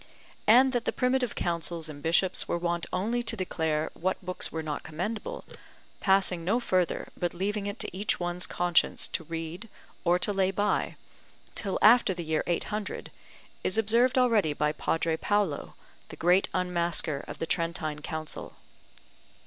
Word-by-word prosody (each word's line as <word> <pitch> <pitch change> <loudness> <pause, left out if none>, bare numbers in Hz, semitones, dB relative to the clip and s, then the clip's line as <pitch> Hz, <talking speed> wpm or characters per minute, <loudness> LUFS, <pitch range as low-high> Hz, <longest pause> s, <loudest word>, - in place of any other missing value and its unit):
And 255 +4 +7
that 240 -1 0
the - - +1
primitive 250 -2 +1
Councils 170 -1 -2
and 145 -2 -8
bishops 170 +4 +2
were - - 0
wont 170 0 -1
only 220 +7 0
to 230 -1 +1
declare 160 -4 -1
what 185 +2 -1
books 180 0 -2
were 160 0 -3
not 150 -2 -3
commendable, 185 +8 -4 0.5
passing 190 -3 +2
no 210 +8 +2
further, 185 -7 0
but 175 -1 -2
leaving 200 +3 -1
it 205 - -4
to - - -4
each 205 +3 0
one's 175 0 -2
conscience 175 -1 +1
to 170 - -3
read 165 +6 -6 0.3
or 175 0 +4
to 205 +3 0
lay 190 -1 +2
by, 205 +2 0 0.6
till 195 -3 -2
after 220 -3 +6
the 175 - -4
year 155 0 0
800, 210 +4 -3 0.5
is 185 - +2
observed 235 +4 +3
already 225 -11 +3
by 150 +1 +1
Padre 165 +1 0
Paolo, 205 -8 0 0.3
the - - -8
great 180 +3 +3
unmasker 170 -5 0
of - - -7
the - - -2
Trentine 165 -3 -1
Council. 155 -1 -6
180 Hz, 155 wpm, -28 LUFS, 165-210 Hz, 0.6 s, And